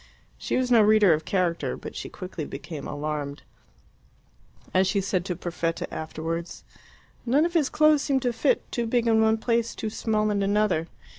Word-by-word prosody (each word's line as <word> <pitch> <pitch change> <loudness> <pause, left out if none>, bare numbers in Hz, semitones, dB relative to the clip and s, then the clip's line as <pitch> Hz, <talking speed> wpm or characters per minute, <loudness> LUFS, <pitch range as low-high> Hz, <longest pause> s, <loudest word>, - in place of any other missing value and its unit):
She - - -1
was 255 -1 0
no 230 -2 +7
reader 210 -4 +5
of 155 0 -2
character, 180 -3 -1
but - - -9
she - - -6
quickly 180 -4 -7
became 145 +1 -7
alarmed. 145 -1 -4 1.3
As 185 0 +3
she 200 - +1
said 190 -2 -1
to 180 - -2
Perfetta 165 -1 -3
afterwards, 165 +2 -5 0.6
"None 275 +6 +3
of 345 - -2
his 310 -5 +2
clothes 305 -1 +4
seemed 270 -2 0
to 245 -1 +1
fit 445 - 0
too 235 -2 -1
big 235 0 +1
in 225 -1 +4
one 220 0 +3
place, 230 0 0
too 220 - -4
small 215 -1 0
in 200 -1 0
another." 200 -5 +1
205 Hz, 175 wpm, -26 LUFS, 170-235 Hz, 1.3 s, no